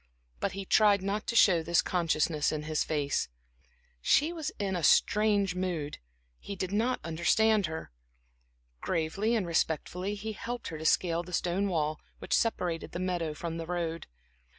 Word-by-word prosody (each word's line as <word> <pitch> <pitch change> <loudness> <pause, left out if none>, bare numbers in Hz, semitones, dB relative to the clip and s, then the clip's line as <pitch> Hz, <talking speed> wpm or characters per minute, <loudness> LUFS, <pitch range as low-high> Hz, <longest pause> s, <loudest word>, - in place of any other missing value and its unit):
But 195 - -1
he 195 0 -5
tried 205 -1 +4
not 205 +2 -2
to 235 - -2
show 180 -7 +6
this 170 +1 +2
consciousness 160 -3 +1
in 150 -1 -3
his 155 0 0
face. 145 - -1 0.7
She 300 - +3
was 315 -3 -3
in 195 -2 -1
a 175 - -2
strange 205 +3 +3
mood; 180 -5 -3 0.4
he 200 - -7
did 185 0 -3
not 230 +5 +1
understand 190 +5 +2
her. 160 - -6 0.9
Gravely 195 - 0
and 210 -5 0
respectfully 170 +4 -1
he 215 +2 -5
helped 240 +3 -5
her 160 - -6
to 160 - -7
scale 170 +1 +2
the 180 +1 -11
stone 180 +4 0
wall, 155 -4 -1 0.2
which - - -4
separated 180 -7 0
the 175 - -3
meadow 175 -4 -2
from 165 +1 -4
the 165 -1 -5
road. 170 -2 -3
180 Hz, 165 wpm, -30 LUFS, 160-205 Hz, 0.9 s, show